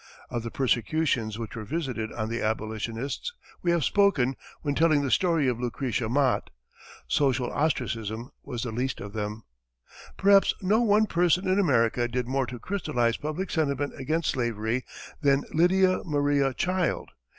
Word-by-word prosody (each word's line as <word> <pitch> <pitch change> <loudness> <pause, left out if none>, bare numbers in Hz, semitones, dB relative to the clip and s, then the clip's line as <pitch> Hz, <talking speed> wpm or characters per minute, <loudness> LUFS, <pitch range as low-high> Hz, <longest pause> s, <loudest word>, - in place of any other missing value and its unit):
Of 120 - -2
the 115 - -5
persecutions 120 -2 0
which 115 -1 -6
were 110 - -5
visited 130 -5 -3
on 110 -2 -3
the 115 +1 -3
abolitionists 110 - -3 0.3
we 175 - 0
have 170 -3 +2
spoken 150 -11 +3 0.3
when 145 -2 0
telling 155 -1 +3
the 135 - -1
story 165 -6 +3
of 120 -2 0
Lucretia 125 -1 -2
Mott. 135 +1 +1 0.6
Social 130 -3 +1
ostracism 115 -5 -2
was 120 -5 -5
the 120 - -3
least 125 +4 -2
of 100 0 -8
them. 105 0 -4 0.7
Perhaps 195 0 +5
no 205 +5 +2
one 215 -1 +4
person 180 0 +2
in 185 +2 +3
America 120 - +2
did 125 0 -2
more 135 0 0
to 125 - -6
crystalize 125 - -1
public 155 +6 -4
sentiment 145 -3 0
against 155 +5 0
slavery 120 -1 -1 0.4
than 140 -1 +3
Lydia 185 +3 +4
Maria 145 -3 +1
Child. 180 +2 -1
135 Hz, 150 wpm, -27 LUFS, 115-165 Hz, 0.7 s, Perhaps